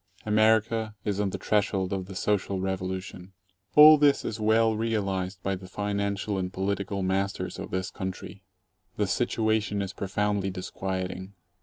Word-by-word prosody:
America 110 0 +2
is 100 -1 -1
on 105 -1 +1
the - - -4
threshold 100 -3 0
of 95 -2 -3
the 95 - -9
Social 100 0 0
Revolution. 95 0 -4 0.4
All 150 0 +10
this 145 -1 +3
is 110 - -4
well 110 +1 +3
realized 100 -4 -2
by 95 - 0
the 95 0 -10
financial 100 0 -2
and 90 0 -3
political 100 +1 -2
masters 95 +1 -2
of - - -6
this 95 +1 -3
country. 95 +1 -6 0.6
The 105 - +2
situation 110 0 0
is 95 0 -6
profoundly 100 0 -1
disquieting. 95 0 -5
100 Hz, 145 wpm, -27 LUFS, 95-105 Hz, 0.6 s, All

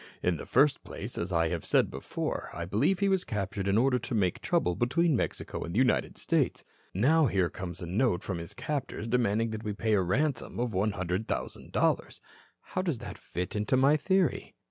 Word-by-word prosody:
In 90 -2 +2
the - - -8
first 145 0 +3
place, - - -7
as 85 +2 -3
I 85 -1 +2
have 85 -2 -3
said - - +2
before, - - -4
I 85 - -4
believe 105 - +2
he 200 - +1
was 190 -2 +2
captured 100 -1 -3
in 100 +2 +3
order 125 +1 +3
to 115 +1 -4
make 95 -5 +1
trouble 90 - +1
between 135 - +2
Mexico - - -3
and 85 +2 -5
the - - +1
United 130 0 +2
States. - - 0 0.3
Now, 145 - +4
here 95 -5 +1
comes 90 -1 -6
a - - -3
note 95 +1 +1
from 95 -4 -3
his 85 - -8
captors 140 -6 -3
demanding 115 -1 +1
that 110 0 -5
we 105 -2 -2
pay 110 +1 0
a 100 - +4
ransom 120 - -1
of 120 -2 -1
one 100 +3 +1
hundred 90 +3 -2
thousand - - -4
dollars. - - +1 0.4
How 185 - -3
does 170 -8 -1
that - - -7
fit 90 +3 -5
into 105 +5 +1
my 135 +3 +5
theory? 185 0 +1
110 Hz, 210 wpm, -29 LUFS, 95-135 Hz, 0.4 s, my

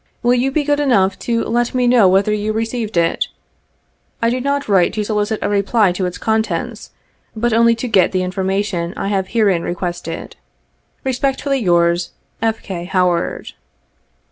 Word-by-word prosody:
Will 240 +1 +4
you 250 +2 +2
be 295 +2 0
good 290 0 +1
enough 200 -10 +2
to 230 -1 -1
let 240 +2 -1
me 250 -1 +2
know 240 -5 +5
whether 195 +3 +3
you 210 +1 -1
received 225 -2 -3
it? 165 0 +1 0.9
I 230 -1 +1
do 255 +1 -1
not 280 +1 -1
write 190 -4 +3
to 215 - -1
solicit 210 0 -1
a - - +1
reply 205 0 +2
to 180 +1 -2
its 180 - -6
contents, 220 0 -2 0.5
but 235 +1 0
only 230 +1 +4
to 240 +2 -4
get 200 -6 +3
the 185 -1 0
information 190 -1 -2
I 195 - -2
have 195 -2 0
herein 200 -7 +2
requested. 175 -1 -4
!t - - -17 0.7
Respectfully, 270 +1 0
yours, 175 -3 +1 0.3
"F. 225 -1 -1
K. 175 -4 -5
HOWARD. 180 -2 0
210 Hz, 170 wpm, -18 LUFS, 185-240 Hz, 0.9 s, know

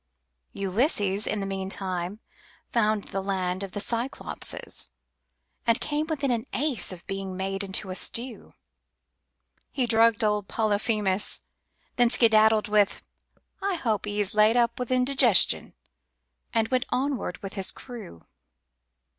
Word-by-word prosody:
Ulysses, 200 - +1
in 210 - -1
the - - -2
meantime, 190 0 -4 0.5
found 215 -3 +2
the 195 - -2
land 185 -1 -2
of 195 -2 -6
the 205 - -3
Cyclopes, 235 +5 -2 0.8
And 230 +1 +4
came 300 +1 -1
within 280 -4 -1
an 235 -2 -1
ace 275 -7 0
of 180 -1 -10
being 195 -1 -4
made 195 +1 -2
into 190 0 -2
a - - -4
stew. 235 +4 -4 1.2
He 260 -3 0
drugged 230 -1 +4
old 210 -2 +1
Polyphemus, 210 -2 0 0.6
then 245 -1 +5
skedaddled 220 -2 +5
with: 210 -1 +2 0.6
"I 390 -1 0
hope 220 - -1
'e's 205 -1 -1
Laid 215 +2 +5
up 235 0 +2
with 250 - -3
indigestion," 255 -4 +3 0.8
and 225 -1 +1
went 255 -1 0
onward 260 -8 -1
with 195 - -6
his 195 -2 -1
crew. 225 - -8
215 Hz, 130 wpm, -26 LUFS, 195-240 Hz, 1.2 s, then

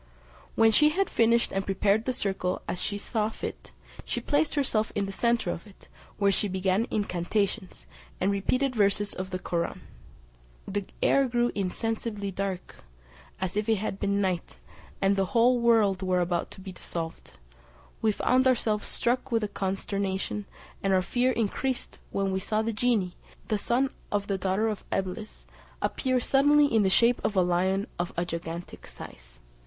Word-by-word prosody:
When 225 0 +5
she 300 +7 +6
had 385 +5 0
finished 235 +1 +3
and 195 - 0
prepared 200 +3 +1
the 255 - +1
circle 190 -6 -2
as 180 - -3
she 205 - -1
thought 215 +1 -2
fit, - - -6 0.3
she - - -2
placed 300 +1 +1
herself 230 -7 +1
in 200 - +1
the 195 - -5
centre 235 -2 +1
of 170 - -7
it, 200 - -17 0.3
where 200 -1 +3
she 205 - +1
began 190 +4 +1
incantations, 200 0 -2 0.3
and 190 +2 +2
repeated 255 +7 +1
verses 205 -1 +2
of 185 0 -5
the 185 - -2
Koraun. 170 -2 -2 0.9
The 200 0 -2 0.2
air 275 -1 +4
grew 240 0 +1
insensibly 210 +1 -2
dark, 190 -1 -4 0.6
as 190 +1 -2
if 210 +1 -1
it 220 - +5
had 200 -1 -3
been 200 0 +1
night, 185 -3 -1 0.5
and 195 +1 +4
the 195 -1 +2
whole 245 +2 +5
world 220 -5 +3
were 185 -1 +1
about 175 -1 0
to - - -12
be 190 0 -7
dissolved: 165 -2 -6 0.7
we 220 - +3
found 255 +5 +2
ourselves 220 -4 +1
struck 250 +2 0
with 225 -3 0
consternation, 195 +1 -2 0.4
and 195 -1 +1
our 185 -1 +3
fear 245 +6 +1
increased 245 +3 -2
when 195 -1 -1
we 190 - 0
saw 215 +3 0
the 230 +1 -1
genie, 215 -5 +1 0.3
the 215 -2 +1
son 255 +5 +1 0.2
of 205 -1 0
the 195 -1 -2
daughter 190 +4 +1
of 215 -2 -3
Eblis, 195 +3 -4 0.3
appear 255 -2 0
suddenly 290 +4 +4
in 230 -6 +3
the 195 - +3
shape 235 +5 +4
of 210 - 0
a 185 - +5
lion 185 +3 +1
of 175 +1 -1
a 175 - +1
gigantic 170 0 -6
size. - - -12
205 Hz, 170 wpm, -28 LUFS, 190-230 Hz, 0.9 s, she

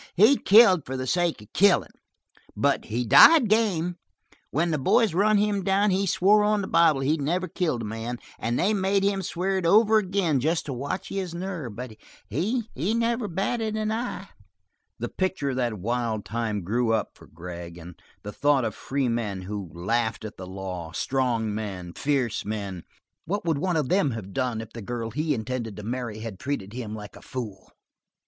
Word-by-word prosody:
He 215 +10 +6
killed 200 - +6
for 130 0 -5
the 130 - -3
sake 170 -5 0
of 105 - -20
killin', 200 -1 +4 0.7
but - - +1
he 120 +3 -2
died 240 - +8
game. 180 -6 +1 0.5
When 165 +4 0
the 155 - 0
boys 210 - +3
run 210 +4 +3
him 205 -1 +1
down 195 +2 +2
he 195 +1 +1
swore 205 +4 +4
on 210 -1 +2
the - - -4
bible 165 -4 +4
that - - -2
he's 155 +3 +1
never 175 +6 -1
killed 155 -12 -1
a - - -4
man, 115 +3 -4 0.2
and 120 +1 -1
they 205 +4 +2
made 195 0 +1
him 200 -1 +1
swear 190 +2 -1
it 180 - -4
over 215 +4 +5
again 185 -7 0
just 160 +6 0
to 140 - -4
watch 140 +9 -4
his 185 -3 -4
nerve; 170 - -5
but 125 -2 -7 0.3
he 200 - -1
never 230 - 0
batted 215 +5 -2
an 215 0 -1
eye." 220 -4 -4 0.7
The 120 - -3
picture 185 -6 -1
of 130 - -4
that 120 -3 0
wild 115 +1 -2
time 110 -3 -2
grew 115 +5 0
up 110 -2 0
for - - -17
Vic - - -26
Gregg, 85 0 -8
and 85 +1 -10 0.3
the 105 - -6
thought 145 -3 +2
of - - -2
free 135 -1 -2
men 110 -5 -2
who 100 -1 -5
laughed 110 +5 -1
at 110 - -7
the 95 - -9
law, 90 -3 -6
strong 120 -2 0
men, 95 -5 -5
fierce 135 -6 -1
men. 100 -5 -5 0.4
What 200 +2 -2
would 160 -4 +1
one 180 +1 0
of 150 -5 -1
these 165 -9 +2
have 100 -4 -8
done 125 -2 -1
if 115 - -11
the 115 - -7
girl 115 +1 -4
he 150 +4 0
intended 115 -2 -4
to 105 - -7
marry 115 -1 -4
had 110 -5 -7
treated 115 -8 -4
him 115 -4 -5
like 105 -1 -9
a - - -13
foil? 110 -7 -7
135 Hz, 195 wpm, -26 LUFS, -, 0.7 s, died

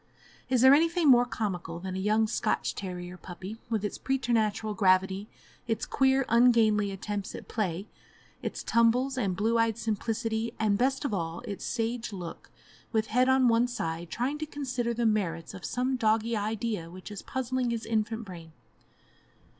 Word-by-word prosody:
Is 255 -2 +3
there 260 +1 +8
anything 330 +2 +3
more 245 -1 +6
comical 180 -8 -3
than 185 +1 -5
a - - -2
young 215 +3 +2
Scotch 215 0 -1
terrier 180 -2 -6
puppy, 185 +5 -8
with 220 -3 -1
its 205 - -4
preternatural 225 -5 0
gravity, 190 0 +2 0.4
its 225 -1 -1
queer, 265 0 +2
ungainly 230 -3 +4
attempts 200 +1 -4
at - - -9
play, 195 -3 -2 0.5
its - - -4
tumbles, 245 +4 +3
and 200 -8 0
blue 225 +4 +1
eyed 230 -1 +2
simplicity, 225 +1 -2
and, 215 -2 +2
best 265 +5 +1
of 245 - -1
all, 165 -3 -3
its 200 - -6
sage 230 0 -2
look, 180 -4 -8 0.4
with 220 -1 0
head 255 +2 +4
on 260 -1 +5
one 230 +1 +4
side, 165 -8 -4
trying 265 - -2
to 310 - -3
consider 255 -5 -2
the 235 0 0
merits 180 -7 0
of 185 -2 -9
some 255 +2 -1
doggie 225 0 +2
idea 210 -4 -2
which 185 +4 -10
is 205 - -6
puzzling 255 -1 -2
his 230 -1 -2
infant 225 0 -1
brain? 165 -4 -10
220 Hz, 165 wpm, -29 LUFS, 195-245 Hz, 0.5 s, there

